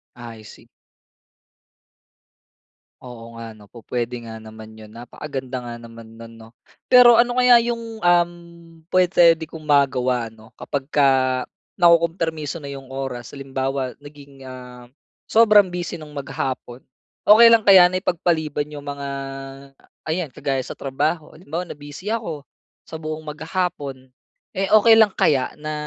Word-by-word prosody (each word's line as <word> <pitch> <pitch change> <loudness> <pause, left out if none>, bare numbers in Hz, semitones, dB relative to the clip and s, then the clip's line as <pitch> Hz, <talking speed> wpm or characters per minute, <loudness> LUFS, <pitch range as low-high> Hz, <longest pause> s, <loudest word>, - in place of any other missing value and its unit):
I 115 -2 -11
see. 105 - -15 2.3
Oo 115 -2 -11
nga, 115 -1 -8
ano, 105 -2 -18
pupuwede 120 +1 -5
nga 110 -1 -9
naman 110 0 -12
yun, 110 -1 -14
napakaganda 130 +3 -7
nga 120 -1 -8
naman 115 -1 -13
nun, 115 0 -12
'no? 115 0 -15 0.4
Pero 250 -1 +8
ano 240 +1 +3
kaya 250 -1 +6
yung, 230 -1 -5
um, 175 0 +3 0.6
pupuwede 175 -3 +4
kong 160 0 -11
magawa 130 -5 +1
ano, 110 0 -18
kapagka 140 0 -1 0.7
nakukumpermiso 165 -3 +1
na 140 -3 -8
yung 135 -1 -11
oras, 130 -3 -6
halimbawa 135 -1 -3
naging, 140 -2 -15
ah, 125 -1 -12 0.4
sobrang 215 -3 +5
busy 175 -2 -6
nung 155 - -11
maghapon. 130 -2 -5 0.5
Okey 230 +3 +8
lang 230 - +6
kaya 190 -3 +7
na 185 - -1
ipagpaliban 160 -5 -1
'yong 145 -1 -8
mga, 140 0 -5 1.0
ayan 160 -3 -2
kagaya 135 -1 -2
sa - - -7
trabaho, 150 +4 -3
halimbawa 170 +1 -6
na - - -8
busy 145 +7 -9
ako 215 -10 -4 0.5
sa 160 - -7
buong 155 0 -6
maghapon. 155 -4 -5 0.5
Eh, 195 +1 -1
okey 225 +1 +7
lang 215 -3 +4
kaya, 135 -7 +1
na 155 0 -6
145 Hz, 135 wpm, -21 LUFS, 125-175 Hz, 2.3 s, Pero